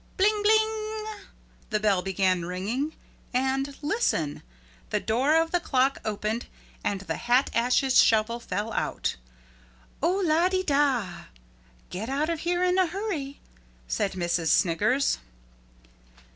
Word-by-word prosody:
Bling 420 Hz, +2 st, +3 dB
bling 435 Hz, 0 st, +1 dB, 0.6 s
the 215 Hz, -2 st, 0 dB
bell 205 Hz, -3 st, +2 dB
began 185 Hz, -1 st, +1 dB
ringing 210 Hz, -, -3 dB, 0.4 s
and 270 Hz, +2 st, 0 dB
listen 290 Hz, -, 0 dB, 0.5 s
the -, -, 0 dB
door 260 Hz, +8 st, +2 dB
of 325 Hz, 0 st, +2 dB
the 355 Hz, -, +2 dB
clock 270 Hz, -4 st, +1 dB
opened 215 Hz, +2 st, -2 dB, 0.4 s
and 200 Hz, -2 st, -1 dB
the 195 Hz, -, -4 dB
hat 250 Hz, +3 st, +2 dB
ashes 250 Hz, +3 st, +4 dB
shovel 225 Hz, +1 st, +2 dB
fell 225 Hz, -1 st, -3 dB
out. -, -, -1 dB, 0.9 s
"Oh 355 Hz, +6 st, +2 dB
lah 335 Hz, +3 st, +3 dB
de 375 Hz, 0 st, 0 dB
dah, 275 Hz, -, +1 dB, 0.7 s
get 210 Hz, +6 st, -4 dB
out 290 Hz, +4 st, 0 dB
of 330 Hz, -, -2 dB
here 350 Hz, +2 st, 0 dB
in 365 Hz, +1 st, +3 dB
a 370 Hz, -, +4 dB
hurry," 330 Hz, -7 st, -4 dB, 0.5 s
said 190 Hz, -, -1 dB
Missus 170 Hz, -2 st, 0 dB
Sniggers. 210 Hz, +10 st, +2 dB
265 Hz, 130 wpm, -27 LUFS, 210-335 Hz, 0.9 s, ashes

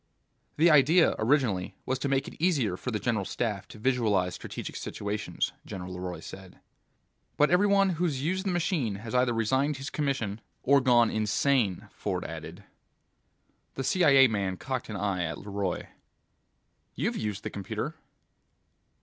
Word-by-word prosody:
"The 165 Hz, +2 st, +6 dB
idea, 155 Hz, +4 st, +5 dB
originally, 110 Hz, -6 st, +1 dB
was 130 Hz, 0 st, -1 dB
to 140 Hz, -, -1 dB
make 135 Hz, 0 st, +1 dB
it -, -, -9 dB
easier 140 Hz, -, +2 dB
for 125 Hz, -, -5 dB
the 110 Hz, -, -1 dB
General 110 Hz, -2 st, 0 dB
Staff 100 Hz, +1 st, -3 dB
to -, -, -12 dB
visualize 105 Hz, -7 st, +1 dB
strategic -, -, -7 dB
situations," 105 Hz, -3 st, -3 dB
General 90 Hz, -1 st, -7 dB
LeRoy 90 Hz, -1 st, -5 dB
said. 95 Hz, -1 st, -11 dB, 0.8 s
"But 150 Hz, +2 st, +4 dB
every 185 Hz, +3 st, +4 dB
one 200 Hz, -1 st, +4 dB
who's 165 Hz, -5 st, -1 dB
used 190 Hz, +5 st, -1 dB
the -, -, +1 dB
machine 165 Hz, -, 0 dB
has 110 Hz, +3 st, -7 dB
either 125 Hz, -1 st, +3 dB
resigned 130 Hz, +6 st, +1 dB
his 135 Hz, +1 st, -6 dB
commission 130 Hz, -8 st, -2 dB, 0.2 s
or 140 Hz, +1 st, +5 dB
gone 120 Hz, -3 st, +4 dB
insane," 110 Hz, -1 st, +1 dB
Ford -, -, -3 dB
added. -, -, -8 dB, 1.1 s
The 135 Hz, -, -3 dB
CIA 140 Hz, -4 st, +6 dB
man 100 Hz, -4 st, -2 dB
cocked 130 Hz, +1 st, -4 dB
an 110 Hz, -, -4 dB
eye 95 Hz, -3 st, -1 dB
at 80 Hz, 0 st, -3 dB
LeRoy. 100 Hz, -2 st, -3 dB, 1.1 s
"You've -, -, -1 dB
used 105 Hz, -2 st, -3 dB
the -, -, -4 dB
computer." 100 Hz, -1 st, -4 dB
120 Hz, 150 wpm, -28 LUFS, 100-140 Hz, 1.1 s, The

